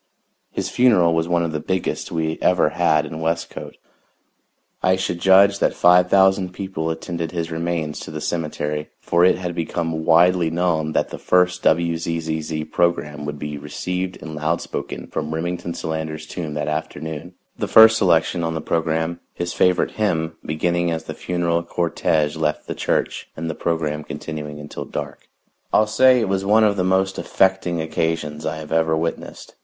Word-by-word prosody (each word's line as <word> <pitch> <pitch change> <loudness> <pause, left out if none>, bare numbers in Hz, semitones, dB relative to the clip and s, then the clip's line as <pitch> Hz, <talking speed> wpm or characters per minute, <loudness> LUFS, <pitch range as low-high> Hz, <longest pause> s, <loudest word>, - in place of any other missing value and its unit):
His - - -3
funeral 100 -10 +4
was 80 0 0
one 85 -1 +1
of 85 - -2
the 80 - -2
biggest 95 +4 -2
we 80 -1 -2
ever 90 -4 +3
had 80 -2 +2
in 80 +1 -7
Westcote. 85 +1 -3 1.0
I 95 0 +3
should 95 -2 -3
judge 100 +1 +5
that - - +1
five 90 +1 +5
thousand 95 -1 +3
people 95 -4 -4
attended 85 0 -4
his 85 -1 -3
remains 80 -2 -2
to - - -8
the 80 0 -5
cemetery, 75 -2 -3
for 85 +1 +2
it 90 - +5
had 90 -1 -4
become 80 -1 -2
widely 85 +1 +4
known 80 -2 0
that - - +1
the - - -8
first 90 0 +2
WZZZ 80 -2 -1
program 75 -4 0
would 75 0 -4
be 75 0 -5
received 90 +5 -4
and 80 - -7
loud 75 +2 -1
spoken - - -6
from 80 +1 -4
Remington 85 +1 -3
Solander's 80 -1 -4
tomb 80 -2 -5
that 75 - -2
afternoon, 80 +2 -5 0.2
the - - -1
first 110 0 +8
selection 85 -2 +2
on 80 0 -2
the - - -2
program 80 +1 -1 0.2
his 85 0 -3
favorite 90 -1 +2
hymn 80 -6 -1
beginning 85 +3 0
as 80 -1 -2
the - - -6
funeral 85 -1 -1
cortege 80 -3 0
left 80 -1 -1
the - - -4
church - - -2
and 80 +1 -3
the - - -5
program 75 -2 -2
continuing 75 -1 -6
until 75 0 -7
dark. - - -7 0.4
I'll 110 - +4
say 130 +4 +5
it 115 - 0
was 95 0 0
one 105 +3 +4
of 105 -1 +3
the 95 - 0
most 95 +1 +1
affecting 95 -3 +1
occasions 80 -1 -2
I - - -2
have 75 -1 -9
ever 80 0 +2
witnessed. 80 +1 -5
85 Hz, 170 wpm, -21 LUFS, 80-90 Hz, 1.0 s, first